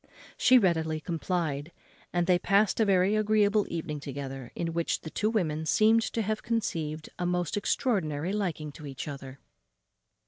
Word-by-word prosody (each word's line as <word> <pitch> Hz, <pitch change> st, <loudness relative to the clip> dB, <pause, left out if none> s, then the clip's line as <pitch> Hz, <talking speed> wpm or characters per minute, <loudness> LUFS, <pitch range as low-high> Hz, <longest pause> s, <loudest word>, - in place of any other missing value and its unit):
She 255 Hz, -, +6 dB
readily 160 Hz, -7 st, +2 dB
complied, 165 Hz, -2 st, -2 dB, 0.4 s
and 175 Hz, 0 st, +1 dB
they 180 Hz, -1 st, +3 dB
past 200 Hz, +4 st, +2 dB
a 220 Hz, -, +4 dB
very 195 Hz, +1 st, +3 dB
agreeable 215 Hz, -1 st, +3 dB
evening 155 Hz, -3 st, -4 dB
together, 135 Hz, -3 st, -6 dB
in 165 Hz, -1 st, -2 dB
which 170 Hz, 0 st, -1 dB
the 160 Hz, -, -8 dB
two 215 Hz, -, 0 dB
women 160 Hz, -8 st, -1 dB
seemed 220 Hz, +6 st, +4 dB
to 225 Hz, -, 0 dB
have 215 Hz, +1 st, -2 dB
conceived 160 Hz, -9 st, -2 dB
a 175 Hz, -, 0 dB
most 180 Hz, -3 st, -1 dB
extraordinary 190 Hz, -, 0 dB
liking 170 Hz, -7 st, -2 dB
to 150 Hz, +1 st, -10 dB
each 135 Hz, +1 st, -6 dB
other. 135 Hz, -2 st, -7 dB
175 Hz, 160 wpm, -29 LUFS, 155-205 Hz, 0.4 s, She